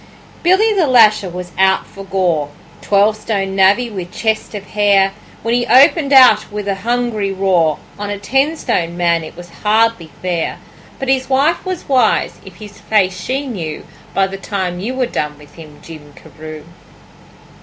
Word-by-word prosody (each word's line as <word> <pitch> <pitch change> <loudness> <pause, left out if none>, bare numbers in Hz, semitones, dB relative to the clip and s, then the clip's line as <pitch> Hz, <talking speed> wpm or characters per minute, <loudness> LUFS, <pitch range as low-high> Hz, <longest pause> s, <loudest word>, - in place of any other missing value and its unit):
Billy 390 +6 +3
the 365 -7 +2
Lasher 215 -6 +4
was 180 0 -7
out 190 0 +3
for 195 - -11
gore 180 -6 -1 0.3
Twelve 205 +1 +2
stone 200 -3 -3
navvy 195 +5 +3
with 185 -4 -7
chest 220 -1 -2
of 200 - -6
hair, 200 -2 +3 0.3
When 230 - -1
he 240 0 0
opened 275 +4 +4
out 260 -5 +6
with 205 -1 -5
a 200 - +1
hungry 235 -3 -1
roar 185 -5 +1 0.2
On 205 0 -4
a 205 - -3
ten 270 +10 0
stone 170 - -2
man 170 -2 +1
it 155 - -11
was 175 0 -11
hardly 215 -5 +1
fair; 175 -3 -2 0.4
But 270 - -5
his 265 0 0
wife 275 +5 +1
was 370 -2 -5
wise 260 -3 +1
if - - -13
his 210 -1 -12
face 190 -4 0
she 270 +3 -2
knew 170 - -6 0.3
By 195 - +3
the 195 0 -6
time 190 -3 -4
you 235 +7 -4
were 260 -1 0
done 150 -10 -4
with 145 -1 -17
him, 155 -3 -13
Jim 150 -3 -12
Carew. 155 0 -11
200 Hz, 175 wpm, -16 LUFS, 180-240 Hz, 0.4 s, out